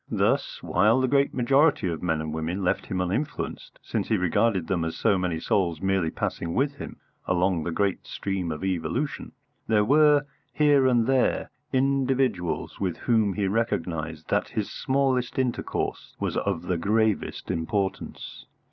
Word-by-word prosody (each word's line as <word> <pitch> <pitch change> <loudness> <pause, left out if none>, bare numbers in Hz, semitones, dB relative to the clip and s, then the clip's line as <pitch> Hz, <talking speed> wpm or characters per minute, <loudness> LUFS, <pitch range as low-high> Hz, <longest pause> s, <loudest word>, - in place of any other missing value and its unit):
Thus, - - 0
while 105 +7 +3
the 130 - +2
great 140 +1 +2
majority 135 - +3
of 85 -3 -3
men 80 -3 0
and 80 0 -4
women 80 +5 -3
left 90 - 0
him 95 - -2
uninfluenced 110 +12 -3
since - - -2
he 110 - +2
regarded 90 +1 +1
them 90 -2 -1
as 80 0 -3
so 100 - +3
many 90 -3 -1
souls 85 -1 0
merely 95 -4 +1
passing 85 +1 -3
with 140 +2 +1
him - - -8 0.3
along 90 -2 +1
the 85 - -2
great 100 +2 -1
stream 95 -4 -3
of 75 +4 -5
evolution 95 - -2 0.4
there 105 -2 +3
were, 150 +2 +5 0.3
here 145 -3 +4
and 120 -3 +3
there, 130 0 +1 0.2
individuals 130 -8 0
with 90 -3 -1
whom 110 -5 +2
he 100 0 -1
recognised 85 -7 -2
that 105 - +1
his 110 -4 -3
smallest 130 -2 0
intercourse 130 -2 -2
was - - -2
of 95 -5 -1
the 90 -1 -1
gravest 110 +3 0
importance. 95 +4 -3
100 Hz, 155 wpm, -26 LUFS, 90-130 Hz, 0.4 s, were